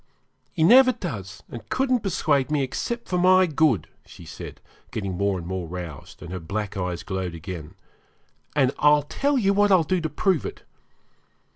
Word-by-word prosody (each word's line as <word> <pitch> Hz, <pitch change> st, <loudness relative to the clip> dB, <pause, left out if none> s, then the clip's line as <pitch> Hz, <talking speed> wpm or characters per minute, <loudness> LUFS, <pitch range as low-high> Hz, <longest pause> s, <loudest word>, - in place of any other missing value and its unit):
'He 160 Hz, -, 0 dB
never 255 Hz, +8 st, +7 dB
does, 105 Hz, -, -7 dB
and 120 Hz, -, -10 dB
couldn't 260 Hz, -1 st, +1 dB
persuade 155 Hz, -, 0 dB
me, 150 Hz, -2 st, +1 dB
except 235 Hz, -, -4 dB
for 180 Hz, -, 0 dB
my 185 Hz, +1 st, +6 dB
good,' 150 Hz, -, +1 dB, 0.2 s
said -, -, -14 dB
she, -, -, -8 dB, 0.4 s
getting 100 Hz, -4 st, -4 dB
more 100 Hz, +1 st, 0 dB
and 85 Hz, -, -7 dB
more 90 Hz, -1 st, -4 dB
roused, 85 Hz, -4 st, -8 dB
and 85 Hz, -, -8 dB
her 90 Hz, -, -4 dB
black 100 Hz, +5 st, -4 dB
eyes 90 Hz, -3 st, -3 dB
glowed 95 Hz, -2 st, -4 dB
again, 85 Hz, 0 st, -8 dB, 0.8 s
'and 135 Hz, -3 st, +3 dB
I'll 150 Hz, 0 st, +5 dB
tell 280 Hz, -, 0 dB
you 200 Hz, -5 st, +2 dB
what 205 Hz, 0 st, +3 dB
I'll 185 Hz, -3 st, +5 dB
do 180 Hz, +3 st, 0 dB
to 160 Hz, -, -2 dB
prove 180 Hz, -, +1 dB
it. -, -, -7 dB
140 Hz, 175 wpm, -24 LUFS, -, 0.8 s, never